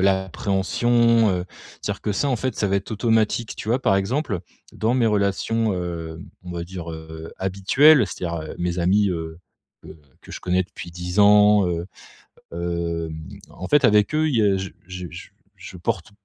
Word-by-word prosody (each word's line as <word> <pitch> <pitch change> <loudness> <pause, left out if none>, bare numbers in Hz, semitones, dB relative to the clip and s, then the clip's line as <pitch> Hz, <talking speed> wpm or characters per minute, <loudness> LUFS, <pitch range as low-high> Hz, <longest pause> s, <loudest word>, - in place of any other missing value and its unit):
l'appréhension, 100 +4 +2
heu, 90 -1 -1 0.4
c'est-à-dire - - -4
que - - -2
ça 120 +8 0
en 130 - +2
fait 130 +2 -3
ça 105 - +1
va 100 0 +1
être 100 - -4
automatique, 110 0 +1
tu - - -7
vois. 120 +3 +2
Par 100 - +3
exemple, 100 - -1 0.3
dans 110 +2 0
mes 120 -3 +3
relations, 105 +2 +1
heu, 85 -3 -5 0.2
on 90 - -9
va 85 -1 -4
dire, 85 -2 -7
heu, 80 0 -9
habituelles, 105 +10 +4
c'est-à-dire, 85 -3 -4
heu, 80 - -7
mes 90 0 -1
amis, 100 +4 +3
heu, 80 -2 -5 0.4
que - - -14 0.3
que - - -13
je - - -7
connais 90 +1 +1
depuis 90 -2 -10
10 90 +3 -2
ans, 105 0 +6
heu. 85 0 -3 0.7
Hem, 85 -2 -3 0.3
en 90 - -8
fait 145 -2 +5
avec 105 +2 +4
eux 155 +1 +2
il 145 - 0
y - - +4
a 100 -2 +3
je 95 0 -4 0.2
je 90 -1 -6
je 90 - -10 0.3
je 90 - -11
porte 95 +1 -3
95 Hz, 185 wpm, -23 LUFS, 85-110 Hz, 0.7 s, ans